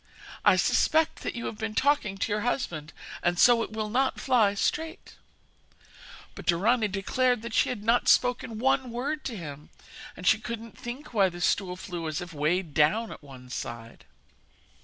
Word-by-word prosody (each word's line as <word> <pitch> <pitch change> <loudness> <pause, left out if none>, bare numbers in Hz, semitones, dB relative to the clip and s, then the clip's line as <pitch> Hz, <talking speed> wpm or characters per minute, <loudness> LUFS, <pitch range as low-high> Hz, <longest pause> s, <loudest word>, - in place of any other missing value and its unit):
I - - +6
suspect 315 0 +2
that - - -4
you 235 - -5
have 215 - -5
been 220 -1 -3
talking 275 -9 +2
to 205 - -2
your 210 0 0
husband, 175 - -2 0.3
and 175 0 +1
so 240 +4 +6
it 225 - -4
will 215 -1 -3
not 260 +5 0
fly 225 -6 +3
straight.' 320 - -2 1.2
But - - -11
Dorani 215 +6 +3
declared 225 +5 0
that 235 -1 -6
she - - +3
had 220 -5 -4
not 230 +2 +2
spoken 245 -2 +2
one 265 +2 +1
word 280 +6 -3
to 235 -5 -4
him, 150 -4 -8 0.5
and 180 - -8
she 210 - +5
couldn't 230 -1 -7
think 245 +3 -8
why 195 -4 +4
the 175 0 -9
stool 180 0 0
flew 175 -3 -6
as 155 -1 -2
if 175 -1 -7
weighed 155 +2 0
down 165 +10 +2
at - - -10
one 130 -3 -13
side. 115 -2 -7
215 Hz, 180 wpm, -27 LUFS, 175-245 Hz, 1.2 s, I